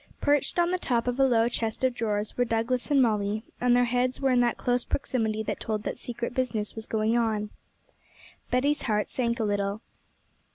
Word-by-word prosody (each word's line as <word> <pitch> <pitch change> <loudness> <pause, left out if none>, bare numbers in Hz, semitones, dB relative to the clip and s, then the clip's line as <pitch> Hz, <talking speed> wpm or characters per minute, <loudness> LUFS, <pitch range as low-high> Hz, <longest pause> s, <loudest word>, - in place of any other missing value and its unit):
Perched 290 +3 +1
on 345 0 +3
the 365 - 0
top 240 -7 0
of 245 +2 -1
a 270 - +6
low 230 -2 +3
chest 225 0 -3
of 260 -1 +3
drawers 210 -3 -2
were 245 - +2
Douglas 235 +3 -1
and 280 -3 +5
Molly, 210 -1 0 0.2
and 245 0 +4
their 245 - +4
heads 250 +1 0
were 270 -1 +2
in 250 - +4
that 240 -1 +2
close 245 0 0
proximity 220 -5 -1
that - - -3
told 215 -1 -3
that - - -4
secret 235 0 -4
business 240 -5 -1
was 220 -1 -7
going 220 +1 +1
on. 220 -3 0 1.0
Betty's 280 +4 +1
heart 210 -3 0
sank 235 -2 -1
a - - +1
little. 205 0 -1
235 Hz, 200 wpm, -27 LUFS, 220-250 Hz, 1.0 s, a